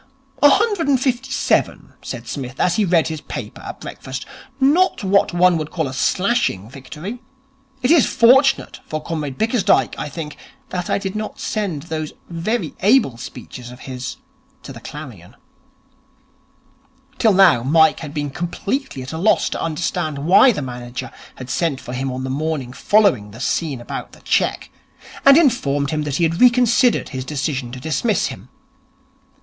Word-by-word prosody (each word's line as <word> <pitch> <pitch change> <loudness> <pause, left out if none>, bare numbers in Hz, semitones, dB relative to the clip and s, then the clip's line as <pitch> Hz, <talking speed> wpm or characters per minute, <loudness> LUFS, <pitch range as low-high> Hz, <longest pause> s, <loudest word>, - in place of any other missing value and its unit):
'A 290 - +8
hundred 405 -1 +2
and 275 -3 +3
fifty 260 0 -1
seven,' 270 +1 0
said - - -7
Psmith, 130 -2 -6
as 175 -1 +2
he 215 - +3
read 170 -3 +2
his 155 -2 -5
paper - - -7
at - - -8
breakfast. 130 0 -7 0.3
'Not 295 - +3
what 195 +1 +3
one 175 0 +4
would 155 -1 -4
call 160 -4 -2
a 130 - -6
slashing 185 - 0
victory. 150 - -8 0.6
It 250 - +3
is 325 -6 +5
fortunate 265 +3 +4
for 155 0 -4
Comrade 150 -5 -4
Bickersdyke, 220 -3 +2
I - - -4
think, 150 0 -7 0.3
that 180 -1 -4
I - - +2
did 195 0 -4
not 215 0 -5
send 190 -10 -3
those 155 -2 -5 0.2
very 170 +2 -2
able 210 - +3
speeches 120 +1 -9
of 125 0 -12
his 130 0 -6 0.5
to - - -9
the - - -10
Clarion'. - - -10 1.8
Till 220 -3 +4
now 185 -10 +6
Mike 160 +5 +4
had 150 -3 -7
been 145 -2 -3
completely 175 - -3
at 130 - -8
a 160 - -4
loss 215 +5 +3
to - - -4
understand 160 -1 -2
why 180 - +6
the 170 -10 -3
manager 125 -1 -6 0.2
had 125 0 -8
sent 160 -6 0
for 125 -1 -8
him 130 +1 -2
on 130 +1 -4
the 130 - -3
morning 140 -3 -3
following 195 - +2
the 110 +3 -12
scene 140 0 -1
about 120 - -7
the - - -16
cheque, - - 0 0.5
and 275 +1 +9
informed 145 - +2
him 155 -1 -1
that 145 -2 -3
he 170 - 0
had 165 +1 0
reconsidered 245 0 +4
his 130 -2 -5
decision 135 -3 -3
to 130 - -7
dismiss 160 - 0
him. - - -14
165 Hz, 170 wpm, -20 LUFS, 135-220 Hz, 1.8 s, and